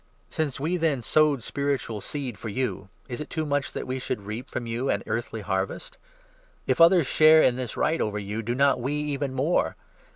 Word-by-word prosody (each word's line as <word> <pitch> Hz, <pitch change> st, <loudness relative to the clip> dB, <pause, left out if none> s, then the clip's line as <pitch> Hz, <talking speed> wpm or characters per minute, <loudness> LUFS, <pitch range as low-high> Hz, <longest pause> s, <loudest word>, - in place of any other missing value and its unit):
Since 145 Hz, -4 st, -2 dB
n -, -, -6 dB
we, 175 Hz, +4 st, +1 dB
then, 155 Hz, -7 st, 0 dB
sowed 150 Hz, -2 st, +3 dB
spiritual 135 Hz, -7 st, -2 dB
seed 135 Hz, -3 st, -5 dB
for 110 Hz, +4 st, -7 dB
you, 105 Hz, -4 st, -3 dB, 0.2 s
is 125 Hz, +1 st, -5 dB
it 150 Hz, -, -7 dB
too 160 Hz, -1 st, -2 dB
much 145 Hz, -1 st, -1 dB
that -, -, -4 dB
we 130 Hz, +1 st, -3 dB
should 105 Hz, -4 st, -4 dB
reap 110 Hz, +4 st, -6 dB
from 120 Hz, -, -4 dB
you 115 Hz, +3 st, -2 dB
an 100 Hz, -, 0 dB
earthly 115 Hz, -1 st, -3 dB
harvest? 95 Hz, -1 st, -3 dB, 0.7 s
If -, -, +1 dB
others 170 Hz, -1 st, +7 dB
share 155 Hz, +3 st, +6 dB
in 125 Hz, -, +4 dB
12 -, -, -7 dB
this 125 Hz, -3 st, -5 dB
right 160 Hz, +2 st, +1 dB
over 105 Hz, -1 st, -1 dB
you, 105 Hz, +2 st, -4 dB
do 120 Hz, +2 st, -2 dB
not 140 Hz, -1 st, +3 dB
we 135 Hz, +4 st, -1 dB
even 145 Hz, -2 st, -2 dB
more 145 Hz, +7 st, +1 dB
130 Hz, 215 wpm, -26 LUFS, 115-150 Hz, 0.7 s, others